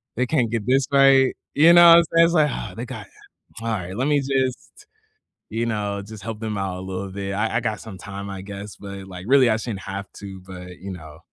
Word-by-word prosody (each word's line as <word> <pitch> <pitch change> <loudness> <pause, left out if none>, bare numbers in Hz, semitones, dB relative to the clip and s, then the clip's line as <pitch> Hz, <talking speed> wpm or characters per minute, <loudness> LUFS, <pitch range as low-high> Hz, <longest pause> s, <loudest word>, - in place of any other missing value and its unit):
they 125 - +1
can't 125 -7 +1
get 115 -3 -2
this 135 +1 +2
right," 135 -1 +5 0.2
you 165 +4 +7
know 175 0 +9
what 165 - +10
I'm - - +3
saying, 165 0 +7
it's 170 - 0
like, 150 -2 +4
"Oh, - - -5
they 120 - -4
got - - -8 0.5
alright, 100 -5 -3
let 130 +3 0
me 145 -1 +3
just 135 - -3 0.7
you 115 +1 0
know, 105 -3 -2
just 105 0 -11
help 110 -2 -5
them 110 -2 -3
out 95 -2 -3
a - - -7
little 95 0 -5
bit, 100 0 -4
I 110 +3 0
I - - +2
got 110 -3 -2
some 105 -4 -9
time, 100 +1 -8
I 95 -1 -6
guess, 100 +1 -9
but, 100 -1 -9
like, 90 0 -9
really 135 -3 +6
I 110 - +2
shouldn't 110 -4 -5
have 100 +1 -6
to, 95 -2 -9
but, 90 -1 -10
you 95 +1 -7
know." 80 -2 -11
105 Hz, 240 wpm, -22 LUFS, 95-130 Hz, 0.7 s, what